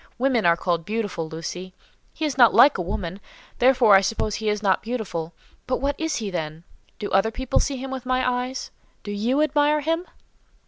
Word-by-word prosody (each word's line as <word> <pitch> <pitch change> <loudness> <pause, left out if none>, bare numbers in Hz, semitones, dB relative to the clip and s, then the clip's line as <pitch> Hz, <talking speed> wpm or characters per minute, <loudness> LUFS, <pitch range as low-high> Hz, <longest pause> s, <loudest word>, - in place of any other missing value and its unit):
Women 245 -6 +2
are 170 0 +4
called 170 -1 -1
beautiful, 205 -5 -3
Lucy; 180 +3 -7 0.4
he 315 - -3
is 290 -4 -2
not 240 -3 +6
like 275 -7 +6
a - - 0
woman, 180 0 -4 0.4
therefore 245 -4 +5
I 195 - +8
suppose 210 +1 -1
he 215 +1 -2
is 210 0 -2
not 195 -2 +2
beautiful, 200 -9 -4 0.4
but 255 - 0
what 280 +2 0
is 320 -2 -1
he, 215 -6 -3
then? 160 -2 -5 0.3
Do 205 - -5
other 195 +3 +3
people 260 +3 -1
see 275 -1 -1
him 265 +1 -6
with 265 -2 -5
my 255 0 +1 0.2
eyes? 260 +1 -7 0.3
Do 205 - -6
you 240 +8 +1
admire 300 0 +2
him?" 330 +4 -1
225 Hz, 195 wpm, -23 LUFS, 190-265 Hz, 0.4 s, I